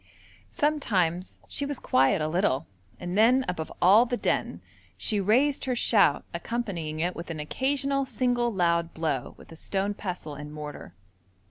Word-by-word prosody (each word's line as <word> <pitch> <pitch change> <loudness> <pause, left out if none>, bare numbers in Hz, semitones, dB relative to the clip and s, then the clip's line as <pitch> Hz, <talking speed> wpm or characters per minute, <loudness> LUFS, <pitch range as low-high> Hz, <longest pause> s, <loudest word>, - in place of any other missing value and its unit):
Sometimes 190 - 0
she - - -1
was 285 -1 -3
quiet 135 - +2
a - - 0
little, 155 -4 +1 0.3
and 175 0 -4
then, 245 +5 +4
above 160 -3 -4
all 205 +7 +6
the 245 0 -1
din, - - -1 0.4
she 210 -3 0
raised 255 +10 +2
her 255 -1 0
shout, 205 -11 +3
accompanying 170 -5 -3
it 175 +3 -1
with 170 +1 -7
an 160 -2 -5
occasional 275 - -1
single 245 -1 0
loud 170 -3 +1
blow 155 -6 -2
with - - -16
a - - -10
stone 195 +4 -2
pestle 180 -7 -6
and 150 +1 -8
mortar. 150 -1 -8
190 Hz, 155 wpm, -27 LUFS, 160-245 Hz, 0.4 s, all